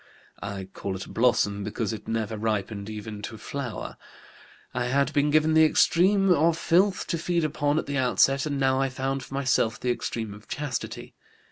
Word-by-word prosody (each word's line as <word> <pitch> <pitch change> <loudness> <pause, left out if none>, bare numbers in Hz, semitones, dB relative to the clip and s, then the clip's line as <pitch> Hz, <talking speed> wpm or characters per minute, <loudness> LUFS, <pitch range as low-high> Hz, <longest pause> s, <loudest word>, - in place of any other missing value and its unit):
I 100 -1 -5
call 95 0 -5
it 95 - -6
a - - -12
blossom 105 -4 +2
because 105 +1 -2
it 105 -1 -8
never 110 -1 -2
ripened 105 -1 -2
even 105 -1 -7
to 110 +1 -6
flower. 135 0 -6 0.8
I 125 -1 -1
had 140 +3 +1
been 145 0 +2
given 155 +1 +3
the 160 0 +6
extreme 190 +5 +4
of 165 0 +3
filth 185 +4 +2
to 170 - -2
feed 170 0 0
upon 145 -1 0
at - - 0
the 140 -1 -2
outset, 135 +2 +3
and 140 -2 -2
now 135 0 +2
I 135 - +1
found 135 +1 -2
for 135 - -8
myself 120 -4 +1
the 125 - 0
extreme 110 -3 -3
of 105 +1 -14
chastity. 145 -5 -5
130 Hz, 190 wpm, -26 LUFS, 110-150 Hz, 0.8 s, the